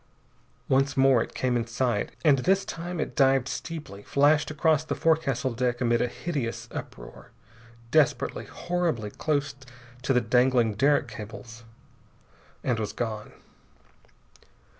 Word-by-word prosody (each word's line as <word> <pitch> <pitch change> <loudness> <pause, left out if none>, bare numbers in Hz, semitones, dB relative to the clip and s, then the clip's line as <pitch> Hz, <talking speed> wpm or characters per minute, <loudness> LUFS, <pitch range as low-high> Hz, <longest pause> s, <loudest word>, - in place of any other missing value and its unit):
Once 135 +1 +2
more 135 -3 +5
it - - -5
came 125 -1 0
in 115 -1 -1
sight, 115 -2 -1 0.2
and 140 -4 +5
this 190 +8 +2
time 175 +1 -5
it - - -3
dived 135 -2 +3
steeply, 150 -11 -6
flashed 145 +6 +3
across 155 0 +2
the 155 - -3
forecastle 140 -6 +1
deck 120 0 -1
amid 120 -1 +2
a - - +2
hideous 135 -3 -4
uproar, - - -9 0.6
desperately, 155 -3 +2
horribly 170 -12 -2
close 145 +1 -1 0.5
to 130 - -1
the 125 - +4
dangling 125 -1 +3
derrick 140 +7 +2
cables, 115 +2 -9 1.0
and 120 -3 0
was 105 -2 -3
gone. 110 -3 -4
130 Hz, 130 wpm, -27 LUFS, 115-150 Hz, 1.0 s, more